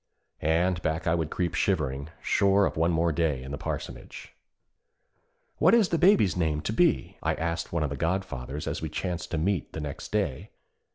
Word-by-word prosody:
And 85 +3 +1
back 80 0 -1
I 80 - +2
would 80 -3 0
creep 85 -2 -1
shivering, 75 -8 0
sure 100 0 +3
of - - -2
one 80 +2 +2 0.2
day 80 -2 +1
more 65 0 -8
in 65 - -7
the 70 - -3
parsonage. - - -6 1.3
'What 175 +8 +6
is 220 -5 +4
the 165 - +1
Baby's 175 - +5
name 80 -4 0
to 110 - -2
be?' 170 +6 +1
I - - 0
asked 85 +1 -3
one 85 -2 0
of 70 - -2
the - - -2
godfathers, 75 -6 -3
as - - -3
we 80 - -3
chanced 90 +2 -3
to 85 - -2
meet 90 +1 -1
the - - -4
next 75 -2 -6
day. - - -1
85 Hz, 190 wpm, -27 LUFS, 75-95 Hz, 1.3 s, What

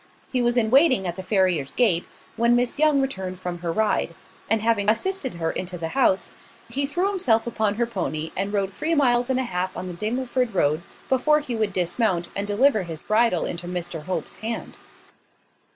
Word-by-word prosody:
He 255 - +1
was 240 0 +1
in 220 -2 +2
waiting 265 - +5
at 175 -1 -2
the 190 - -5
farrier's 185 -8 +1
gate, 195 -9 +2 0.3
when 235 +1 +3
Miss 245 +3 0
Young 300 -2 +4
returned 190 -9 -3
from 180 -1 -5
her 170 -1 -2
ride; 215 +4 0 0.3
and 225 - +3
having 215 -2 +2
assisted 265 - 0
her 165 -1 -1
into 180 -1 -4
the 165 -1 -4
house, 245 -6 +1 0.4
he 275 +4 -1
threw 350 +7 0
himself 245 - +2
upon 220 -3 0
her 235 +2 +1
pony, 160 - -3
and 195 +2 -1
rode 195 -2 -1
three 320 - -1
miles 245 -3 +3
and 260 -1 +1
a - - 0
half 185 -4 -3
on - - -4
the 180 - -5
Dingleford 240 +3 -2
road 155 -1 +2 0.3
before 300 +4 +3
he 260 -5 -4
would 215 -2 0
dismount, 180 0 0
and 200 +1 -2
deliver 215 +2 +3
his 165 -3 -6
bridle 215 -5 +2
into 175 0 -3
Mr 175 -3 -5
Hope's 175 -4 -4
hand. 225 +1 -5
215 Hz, 195 wpm, -24 LUFS, 180-250 Hz, 0.4 s, waiting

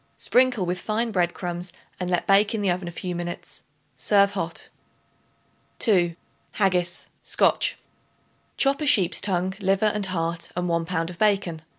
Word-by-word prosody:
Sprinkle 250 -6 +2
with 180 +1 -2
fine 225 +2 -1
bread 175 -3 0
crumbs 175 0 -4 0.3
and 180 -1 -3
let 175 -1 0
bake 200 +2 +4
in 215 - -2
the 195 -3 +2
oven 175 0 -3
a - - -5
few 180 +1 -4
minutes. 175 0 -6 0.3
Serve 200 +9 +3
hot. 170 -4 -4 1.1
2. 175 -7 +2 0.4
Haggis 180 -3 0
(SCOTCH). - - +1 0.8
Chop 275 +2 +2
a 300 - 0
sheep's 200 -11 +3
tongue, 185 -1 0
liver 195 +1 +1
and 210 -2 +1
heart 165 -2 -2
and 180 0 -1
1 170 -1 0
pound 165 0 -2
of 175 - -13
bacon. 195 -6 +1
185 Hz, 160 wpm, -24 LUFS, 175-205 Hz, 1.1 s, bake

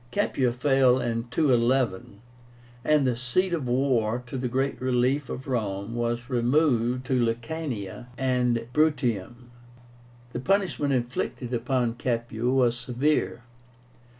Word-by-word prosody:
Capua 125 0 +1
fell 130 0 +3
in 115 -1 -2
211, 120 -6 +1 0.6
and 150 -1 +3
the 125 -2 +1
seat 130 +10 0
of 150 -7 -2
war, 125 -2 +1
to 120 - -8
the 125 -1 -1
great 130 +2 -1
relief 130 +2 +1
of 130 - -6
Rome, 105 -4 -2
was 120 0 -2
removed 125 -1 +1
to 125 -1 +1
Lucania 120 -3 -4
and 125 -3 +1
Bruttium. 120 -6 0 0.8
The - - -3
punishment 185 -3 +1
inflicted 125 0 -2
upon 120 0 0
Capua 120 -1 -1
was 125 -3 +3
severe. 125 +2 -1
125 Hz, 120 wpm, -26 LUFS, 120-135 Hz, 0.8 s, fell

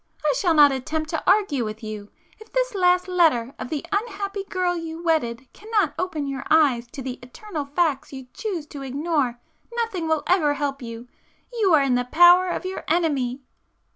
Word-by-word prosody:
I - - +3
shall 355 -8 +2
not 290 -2 +7
attempt 310 +4 -3
to - - -1
argue 380 - +3
with 215 +1 -6
you. 210 -1 -7 0.3
If 435 0 -15
this - - 0
last 360 -1 +3
letter 315 -9 +2
of - - -5
the 300 +1 -3
unhappy 400 -1 -2
girl 365 -2 -1
you 330 0 -6
wedded 265 -7 0
cannot 420 -7 0
open 325 -6 -2
your 275 -1 -4
eyes 280 -7 +3
to 270 - -6
the 255 0 -5
eternal 300 - -7
facts 295 0 0
you 265 -2 -8
choose 375 -9 -4
to 285 - -8
ignore, 275 -2 -1 0.3
nothing 455 -8 -2
will 315 -2 +1
ever 310 -6 +2
help 280 -1 -3
you. 230 0 -8 0.5
You 405 -8 +3
are 290 - +4
in 270 -2 +1
the 245 0 +1
power 350 +6 +6
of 360 - -3
your 375 +1 -5
enemy!" 280 -6 0
315 Hz, 185 wpm, -23 LUFS, 265-365 Hz, 0.5 s, not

